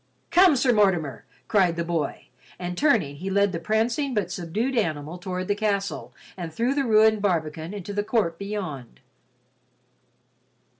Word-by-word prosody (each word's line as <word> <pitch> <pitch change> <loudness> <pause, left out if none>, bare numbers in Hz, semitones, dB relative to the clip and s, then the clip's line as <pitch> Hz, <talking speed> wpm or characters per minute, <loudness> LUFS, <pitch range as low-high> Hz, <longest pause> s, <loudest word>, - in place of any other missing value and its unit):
"Come, 360 -3 +6
Sir 250 -1 +3
Mortimer!" 175 - +1 0.2
cried 185 -5 +3
the 170 - -1
boy, 165 -3 -2 0.3
and 180 0 -4
turning 195 - +2
he 190 +5 -4
led 200 0 +2
the 170 - -3
prancing 230 - 0
but 190 -4 -1
subdued 195 +9 -2
animal 160 -5 -2
toward 185 0 -4
the 205 - +2
castle 200 -2 -2 0.2
and 175 -3 -6
through 235 +10 0
the 280 -1 0
ruined 220 -1 +4
barbican 160 -4 -1
into 205 -1 -6
the 205 0 0
court 205 -7 0
beyond. 185 - -5
195 Hz, 150 wpm, -25 LUFS, 170-220 Hz, 0.3 s, Come